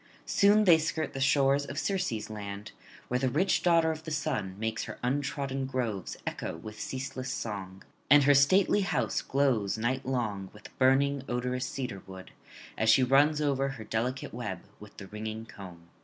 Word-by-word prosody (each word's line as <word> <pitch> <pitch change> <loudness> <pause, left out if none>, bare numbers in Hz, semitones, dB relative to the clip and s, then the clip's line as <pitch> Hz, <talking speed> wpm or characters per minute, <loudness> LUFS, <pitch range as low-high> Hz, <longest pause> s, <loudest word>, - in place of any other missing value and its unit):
Soon 205 +1 +4
they 170 -5 +6
skirt 160 0 -2
the 135 - -4
shores 140 0 +3
of 140 0 -7
Circe's 180 - -1
land, 105 0 -7 0.4
where 125 - 0
the 130 0 +1
rich 180 +9 +1
daughter 165 -2 +4
of 160 0 -6
the 160 - -6
Sun 140 -11 -2
makes 110 +1 -2
her - - -8
untrodden 135 0 -2
groves 115 -8 -3
echo - - -4
with 105 +6 -10
ceaseless 130 -1 -4
song; 95 -3 -5 0.3
and 145 +1 +7
her 145 +1 +6
stately 185 +9 +4
house 170 -9 0
glows 130 -8 +1
nightlong 120 -5 -2
with 105 0 -14
burning 135 +1 +3
odorous 125 +1 -2
cedarwood, 95 -8 -7 0.5
as 110 - +2
she 130 +4 +6
runs 145 +4 +4
over 135 -2 +1
her 135 -5 -6
delicate 120 +5 -3
web 105 -7 -5 0.2
with 105 0 -14
the 100 - -8
ringing 110 +2 -6
comb. 95 -6 -12
130 Hz, 165 wpm, -29 LUFS, 110-140 Hz, 0.5 s, and